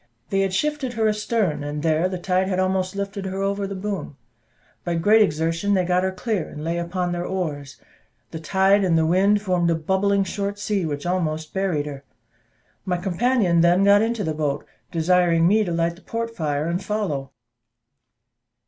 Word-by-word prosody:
They 195 - +1
had 195 -1 +1
shifted 285 +4 -1
her 220 -2 +1
astern, 210 -7 0
and 145 +1 -4
there 165 +2 +2
the 185 - -3
tide 185 +1 0
had 185 -1 -1
almost 185 0 0
lifted 200 0 -4
her 190 +1 -3
over 200 0 -1
the 195 - -5
boom; 190 -7 -5 0.7
by 175 -1 -1
great 210 +7 +4
exertion 165 +3 +1
they 185 -1 +1
got 180 +1 +2
her 190 0 0
clear, 190 0 -2
and 150 - -8
lay 170 +1 -1
upon 175 +1 -2
their 175 0 -2
oars: 150 -7 -4 0.5
the 160 - -6
tide 195 +4 +3
and 175 -3 +3
the 160 - +3
wind 200 +5 +3
formed 180 -3 +1
a 165 - +2
bubbling 190 +5 +1
short 200 +1 -3
sea, 205 -4 -1
which 145 0 -4
almost 160 -3 -2
buried 185 -7 0
her. 140 -2 -7 0.8
My 180 -2 -1
companion 190 -1 +2
then 175 +3 +4
got 200 +1 +6
into 225 -1 -1
the 160 -3 -1
boat, 145 -2 -2 0.3
desiring 170 0 +3
me 215 +3 +4
to 180 - -3
light 170 0 0
the - - -17
port 230 +1 -4
fire, 150 -3 -1
and 175 +3 -2
follow. 185 -10 -2
185 Hz, 185 wpm, -23 LUFS, 165-200 Hz, 0.8 s, got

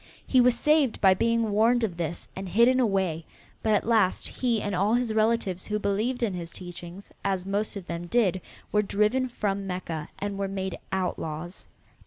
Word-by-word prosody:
He 255 - +4
was 245 0 +4
saved 300 -6 +3
by 190 -2 +6
being 230 +2 +1
warned 230 +3 +3
of 195 -6 -1
this 170 0 -4
and 190 0 -5
hidden 235 +7 +4
away, 190 -8 +1 0.4
but 220 -1 +3
at - - 0
last 220 -5 +2
he 240 -3 0
and 205 -1 -3
all 200 +5 +2
his 240 -2 0
relatives 215 -4 +1
who 210 - 0
believed 215 +5 -1
in 210 -5 0
his 170 -2 -5
teachings, 175 +1 -9
as 190 -2 -1
most 205 +2 -1
of 195 -3 -6
them 170 0 -5
did, 190 -3 +2 0.3
were 210 - +3
driven 215 +6 +1
from 200 -4 -2
Mecca 170 -4 -4
and 200 -1 -4
were 195 - 0
made 190 -1 -4
outlaws. 175 -2 -3
200 Hz, 185 wpm, -27 LUFS, 185-230 Hz, 0.4 s, by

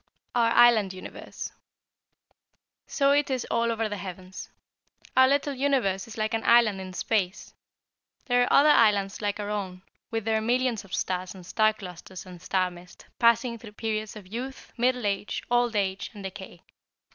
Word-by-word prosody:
OUR 235 -1 +3
ISLAND 230 -5 +5
UNIVERSE. 185 - -8 1.4
"So 275 -1 +2
it 290 0 +2
is 260 -3 -1
all 230 0 +1
over 225 -1 -1
the 205 -1 -5
heavens. 185 0 -8 0.7
Our 260 0 +7
little 280 +1 +1
universe 255 -9 0
is 225 - -10
like 215 +1 -1
an 225 - -1
island 225 -5 +4
in 185 -1 -8
space. 195 -1 -2 0.7
There 245 -1 +3
are 245 - +1
other 300 +2 +6
islands 205 -5 +3
like 205 0 -2
our 205 0 -3
own, 190 -3 -4 0.3
with 225 -2 -3
their 220 -1 +1
millions 245 0 0
of 190 -2 -5
stars 185 0 -3
and 185 -2 -12
star 215 +4 +2
clusters 185 -2 -10
and 180 -2 -12
star 185 0 0
mist, 175 0 -14
passing 235 0 +3
through 215 -2 -12
the - - -38
periods 215 -1 -3
of 210 -3 -10
youth, 245 +7 -7
middle 250 -1 +1
age, 200 0 -2
old 240 -1 +2
age, 195 -2 -1
and 205 - -9
decay. 190 -3 -9
215 Hz, 170 wpm, -27 LUFS, 190-240 Hz, 1.4 s, Our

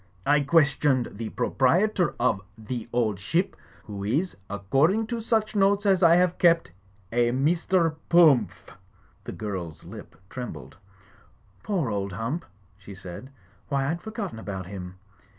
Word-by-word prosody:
I 145 +1 +4
questioned 145 -3 +2
the 110 +1 -6
proprietor 175 - +1
of 120 -6 +1 0.2
'The 115 +1 -6
Old 110 -5 0
Ship* 165 - -1 0.3
who 100 -3 -7
is, 145 - -1
according 135 - +1
to 235 0 -4
such 220 -1 0
notes 200 +1 +3
as 195 -2 +3
I 170 -1 +7
have 180 0 +2
kept, 170 -1 +3 0.4
a 120 0 +2
Mr. 165 +5 +1 0.2
Pumph." 150 - +4 0.5
The - - -5
girl's 95 -7 -6
lip - - -11
trembled. 125 +2 -8 0.8
"Poor 175 - -1
old 100 -2 -3
Hump!" 130 - -3 0.3
she 100 0 -11
said. 90 +7 -9 0.4
"Why, 140 0 0
I'd 170 +1 -4
forgotten 210 - -6
about 95 -4 -6
him. 90 -1 -8
135 Hz, 135 wpm, -26 LUFS, 105-175 Hz, 0.8 s, I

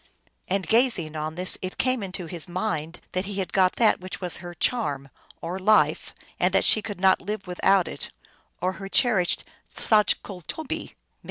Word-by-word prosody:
And, 190 0 0
gazing 225 -10 +2
on 155 +1 -4
this, 180 +1 +4
it 185 0 -5
came 255 -2 +1
into 185 -2 -5
his 170 +1 -5
mind 175 -3 -3
that 185 +1 -1
he 200 0 -5
had 190 -2 -3
got 185 -1 +3
that 225 -2 +3
which 185 +1 -6
was 180 -2 +1
her 175 -1 -9
charm, 140 - -1 0.3
or 175 +3 -4
life, 210 +3 +2 0.2
and - - +3
that - - +3
she 215 - +4
could 205 -3 -6
not 190 0 +4
live 210 +2 -4
without 185 +1 +2
it, - - -5 0.5
1 180 - 0
or - - -3
her 195 -1 -6
cher 245 -5 +4
ished 180 -1 0 0.3
saJcultobee 210 - 0
(M.). - - -25
185 Hz, 185 wpm, -25 LUFS, 175-210 Hz, 0.5 s, this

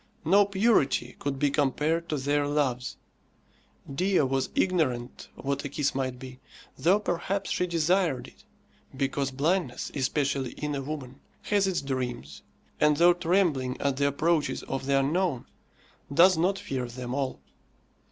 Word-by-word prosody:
No 200 +5 +5
purity 195 - +2
could 140 -1 -2
be 145 0 +1
compared 150 +4 0
to 150 - 0
their 145 +1 0
loves. 135 -3 -1 1.0
Dea 185 +5 +2
was 135 -1 0
ignorant 150 -10 0
what 140 +1 -3
a 145 - -4
kiss 140 0 -1
might 130 -2 -2
be, 130 0 -10 0.4
though 175 +9 +3
perhaps 195 +1 -2
she 180 - 0
desired 170 -3 +1
it; - - -18 0.5
because 135 0 0
blindness, 145 +1 -1
especially 135 -1 -1
in 150 0 -4
a 140 - -2
woman, 135 -2 -6 0.2
has 200 -2 +2
its 185 -6 -1
dreams, 125 - -4 0.4
and 150 -1 +4
though 175 +2 +6
trembling 170 -7 +1
at 140 -2 0
the 140 0 +2
approaches 155 +2 0
of 135 0 -4
the 140 0 +3
unknown, 150 -1 0 0.7
does 180 +6 +6
not 180 +5 +1
fear 135 -11 -4
them 125 +1 -6
all. 135 -1 -2
145 Hz, 145 wpm, -27 LUFS, 135-170 Hz, 1.0 s, though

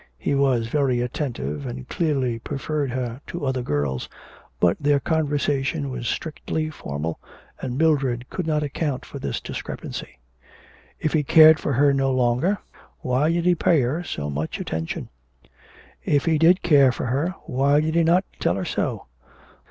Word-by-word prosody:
He - - -1
was 135 -4 +2
very 130 0 +1
attentive, 95 - -3
and 65 +1 -7
clearly 135 -8 0
preferred 145 +2 -3
her 125 0 -4
to 170 -4 -4
other 130 -1 0
girls, 70 - -2 0.5
but 85 - +4
their 145 -1 +3
conversation 145 -1 0
was 120 -2 -4
strictly 155 +2 -3
formal, 75 - -5 0.4
and 125 0 -3
Mildred 135 -6 +1
could 180 -3 -3
not 150 -1 +1
account 145 -2 -2
for - - -8
this - - -3
discrepancy. - - -7 0.8
If 155 - -1
he 155 - +3
cared 155 +2 +7
for 145 - -1
her 140 +2 +4
no 135 -1 +1
longer, 130 +10 +2 0.4
why 130 +5 +1
did 170 0 0
he 180 - +5
pay 165 -3 +3
her 140 +8 -1
so 75 - -4
much 75 +3 -3
attention. 80 0 -4 0.9
If 145 -1 +1
he 160 -2 +2
did 175 +4 +5
care 140 -6 +6
for - - -4
her, 145 +9 -1
why 140 +3 +2
did 155 +1 0
he 170 - +3
not 175 +4 +3
tell - - +1
her - - -3
so. - - -2
140 Hz, 160 wpm, -23 LUFS, 120-155 Hz, 0.9 s, cared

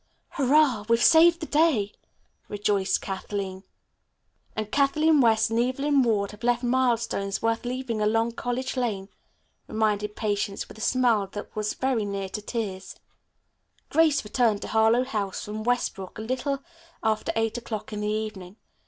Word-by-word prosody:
"Hurrah, 275 -5 +3
we've 230 0 +4
saved 335 +1 +6
the - - -2
day," 295 -11 +2 0.5
rejoiced 205 -1 0
Kathleen. 195 -1 -4 0.9
"And 215 -1 -4
Kathleen 300 +2 +3
West 225 -1 +3
and 225 - +1
Evelyn 275 +3 +2
Ward 210 -5 +1
have 210 - -14
left 240 +1 +1
milestones 235 -5 0
worth 225 +1 0
leaving 245 -3 -3
along 225 +2 +2
College 245 +3 -3
Lane," 210 -6 -2 0.6
reminded 210 -1 0
Patience 205 -1 -2
with 220 - -13
a - - -8
smile 235 -5 +2
that 205 - -7
was 215 0 -2
very 260 -4 0
near 200 -1 -3
to 210 - -5
tears. 205 -4 -5 0.9
Grace 310 -2 +3
returned 215 -1 +1
to - - -6
Harlowe 225 +2 +4
House 210 -7 -3
from 215 +1 -5
Westbrook 220 -5 -2
at 220 - -5
a - - -8
little 270 +2 -2 0.4
after 220 -1 0
eight 225 +1 0
o'clock 220 -2 -6
in 210 - -4
the 210 - -1
evening. 210 -3 -4
225 Hz, 155 wpm, -26 LUFS, 210-255 Hz, 0.9 s, saved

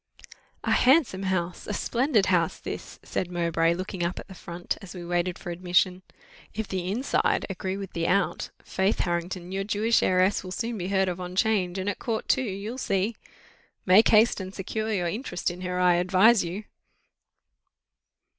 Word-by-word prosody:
"A - - 0
handsome 260 - +4
house 180 -2 -2
a 210 - -2
splendid 240 -4 +1
house, 175 -3 +2
this," - - -7
said 180 - -3
Mowbray, 170 -1 +1
looking 185 0 -4
up 170 +2 -2
at - - -9
the 195 - -10
front, 175 -1 -5
as 195 -2 -10
we 175 -1 -7
waited 175 +1 -1
for 175 - -6
admission. 180 +1 +1 0.5
"If 220 -1 -3
the 185 -1 -3
inside 240 +8 +1
agree 190 0 -3
with 195 -2 -7
the 165 -1 -1
out, 195 +1 +1
faith, 190 +2 0
Harrington, 175 +1 -3
your 195 +1 -1
Jewish 215 +3 +2
heiress 185 +2 +2
will 185 - -7
soon 230 +4 -3
be 180 - -3
heard 190 -1 +2
of 180 0 -3
on 180 0 -6
'Change, 190 -3 +1
and 190 +1 -3
at 205 - -2
court 225 -2 -3
too, 265 - +3
you'll 215 +2 -4
see. 200 0 0 0.7
Make 195 +4 +6
haste 220 +1 +5
and 190 0 -7
secure 215 +3 -3
your 180 -5 0
interest 195 -2 -2
in 175 +1 -9
her, 180 0 -2
I 180 -1 +4
advise 190 +5 +5
you." 180 +5 -5
185 Hz, 180 wpm, -26 LUFS, 180-210 Hz, 0.7 s, Make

